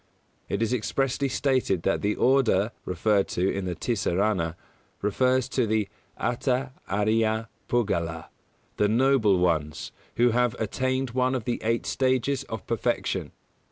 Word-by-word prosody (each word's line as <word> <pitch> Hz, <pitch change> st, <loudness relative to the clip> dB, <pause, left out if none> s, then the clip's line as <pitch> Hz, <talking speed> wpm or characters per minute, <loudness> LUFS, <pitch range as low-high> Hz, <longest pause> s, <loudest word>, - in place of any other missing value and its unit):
It -, -, 0 dB
is 115 Hz, +2 st, 0 dB
expressly 135 Hz, +3 st, 0 dB
stated 130 Hz, -, +1 dB
that 95 Hz, -, +1 dB
the 105 Hz, +1 st, 0 dB
Order 120 Hz, -6 st, +3 dB
referred 100 Hz, +3 st, +1 dB
to 90 Hz, +2 st, +2 dB
in 100 Hz, -1 st, -3 dB
the 90 Hz, -1 st, -3 dB
"Tisarana" 95 Hz, -6 st, 0 dB, 0.5 s
refers 130 Hz, +5 st, +2 dB
to 125 Hz, -3 st, +1 dB
the 105 Hz, -2 st, 0 dB, 0.3 s
"Attha 125 Hz, +2 st, 0 dB, 0.2 s
Ariya 110 Hz, +2 st, +1 dB, 0.2 s
Puggala" 85 Hz, -9 st, -1 dB, 0.5 s
the 105 Hz, -, +3 dB
Noble 115 Hz, -4 st, +4 dB
Ones 80 Hz, -4 st, 0 dB, 0.2 s
who 120 Hz, 0 st, +4 dB
have 120 Hz, 0 st, +2 dB
attained 130 Hz, +4 st, -1 dB
one 130 Hz, +1 st, +1 dB
of 125 Hz, -, -2 dB
the 120 Hz, -, -2 dB
eight 115 Hz, +1 st, 0 dB
stages 130 Hz, +1 st, +1 dB
of 110 Hz, -, -6 dB
perfection. 115 Hz, -3 st, -1 dB
115 Hz, 135 wpm, -26 LUFS, 100-130 Hz, 0.5 s, Noble